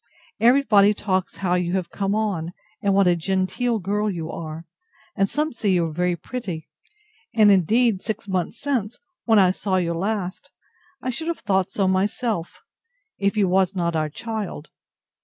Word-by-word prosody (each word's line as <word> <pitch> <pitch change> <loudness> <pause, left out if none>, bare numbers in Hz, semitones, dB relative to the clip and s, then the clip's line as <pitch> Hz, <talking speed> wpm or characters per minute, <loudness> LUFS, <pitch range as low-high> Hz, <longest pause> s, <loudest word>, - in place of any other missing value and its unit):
Every 245 +5 +5
body 210 -3 +5
talks 190 -3 -1
how 175 - +2
you 180 -1 0
have 185 -3 -2
come 200 0 -1
on, 185 -6 -1 0.3
and 200 -1 +2
what 200 0 +5
a 175 -1 +4
genteel 190 +7 0
girl 210 +2 -1
you 165 -4 -4
are; 160 0 -7 0.5
and 195 -1 +1
some 305 +1 -1
say 215 -3 -1
you 180 -3 +3
are 160 - -4
very 180 +2 0
pretty; 180 -6 -6 0.7
and, 215 -2 +6
indeed, 205 +3 +3
six 215 -1 -4
months 185 +3 -2
since, 245 -6 -1 0.3
when 225 -2 +4
I 185 -2 +6
saw 190 0 -1
you 170 -2 +1
last, 190 +1 -3 0.5
I 255 - -1
should 320 +7 -4
have 335 - -2
thought 190 -1 +1
so 195 -1 0
myself, 195 0 -1 0.6
if 200 +2 0
you 200 -2 +3
was 190 +1 +2
not 170 -2 0
our 155 -1 0
child. 210 -3 -5
195 Hz, 175 wpm, -23 LUFS, 180-215 Hz, 0.7 s, and